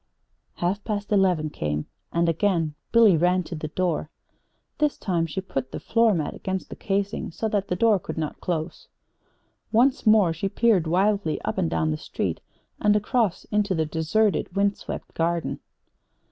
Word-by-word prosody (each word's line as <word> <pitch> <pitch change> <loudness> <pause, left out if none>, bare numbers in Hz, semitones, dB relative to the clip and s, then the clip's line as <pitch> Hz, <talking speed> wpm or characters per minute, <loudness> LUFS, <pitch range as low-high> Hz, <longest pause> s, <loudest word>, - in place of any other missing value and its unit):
Half 190 +4 -1
past 205 -2 -3
eleven 180 -7 +2
came, 75 - -2 0.3
and 170 0 +1
again 165 -2 +1 0.2
Billy 225 -5 +6
ran 180 +3 +2
to 175 - -8
the 155 -1 -4
door. 165 -2 -1 0.7
This 300 -1 +1
time 170 -4 0
she 190 +4 -4
put 135 -8 -4
the - - -5
floor 230 -3 +3
mat 155 -3 -2
against 190 0 -4
the - - -5
casing 200 +1 -2
so 220 +6 -3
that 205 -2 -1
the 180 - -1
door 215 +1 +3
could - - -7
not 155 -2 -4
close. 175 - -3 0.8
Once 245 +1 +3
more 210 -6 +5
she 180 +5 -2
peered 205 -7 +2
wildly 190 -1 +1
up - - -2
and 80 - +1
down 80 -1 0
the 75 - -1
street, - - -3 0.4
and 210 0 +3
across 210 -2 +1
into 205 -2 +1
the 160 -1 +1
deserted, 175 +6 0
wind 200 0 +2
swept - - -7
Garden. 170 0 -1
185 Hz, 170 wpm, -25 LUFS, 165-210 Hz, 0.8 s, Billy